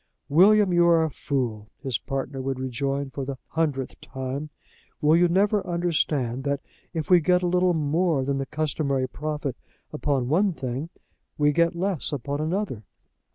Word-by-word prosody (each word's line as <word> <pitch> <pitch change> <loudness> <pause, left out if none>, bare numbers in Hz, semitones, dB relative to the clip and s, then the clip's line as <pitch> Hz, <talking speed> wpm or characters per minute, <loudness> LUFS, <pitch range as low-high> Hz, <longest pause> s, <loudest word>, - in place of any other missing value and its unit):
"William, 195 +4 +5
you 175 0 +5
are 165 -1 +5
a 160 - -1
fool," 115 -8 -3
his 130 -6 -1
partner 135 +2 -4
would 135 0 -2
rejoin 135 +2 -2
for 140 - -4
the 135 0 -5
hundredth 145 -5 -2
time. 135 +3 -5 0.5
"Will 155 0 +4
you 175 +1 +5
never 200 +4 +2
understand 150 -8 0
that, 140 0 0 0.3
if 160 0 -4
we 180 - +8
get 180 +3 +2
a - - +2
little 180 0 +3
more 155 -1 +1
than 135 0 0
the 135 - -3
customary 145 -3 -1
profit 150 -2 -4 0.4
upon 140 -4 0
one 185 +7 +2
thing, 130 +2 -4 0.5
we 150 0 +4
get 170 +3 +2
less 185 -2 -1
upon 145 +1 -3
another? 160 - -2
150 Hz, 160 wpm, -25 LUFS, 135-170 Hz, 0.5 s, we